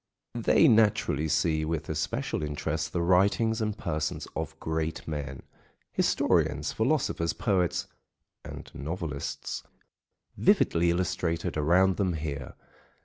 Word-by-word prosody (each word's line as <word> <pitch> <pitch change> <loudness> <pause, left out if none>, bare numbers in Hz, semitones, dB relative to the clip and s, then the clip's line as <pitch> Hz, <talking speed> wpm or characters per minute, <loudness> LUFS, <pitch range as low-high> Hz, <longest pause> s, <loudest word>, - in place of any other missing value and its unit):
They 120 +7 +4
naturally 105 - +3
see 80 +1 +1
with 80 0 -2
especial 80 0 -2
interest 75 +1 -2
the 85 - -1
writings 100 +6 +3
and 105 -1 -1
persons 75 -4 -3
of 80 -2 -4
great 80 0 -3
men—historians, 70 -3 -1
philosophers, 85 0 0
poets, 90 -4 0 0.6
and - - -9
novelists, 75 -1 -4 0.7
vividly 85 +1 +3
illustrated 85 -1 -1
around 90 +5 +3
them 95 -3 +1
here. 75 -4 -5
85 Hz, 100 wpm, -28 LUFS, 75-95 Hz, 0.7 s, They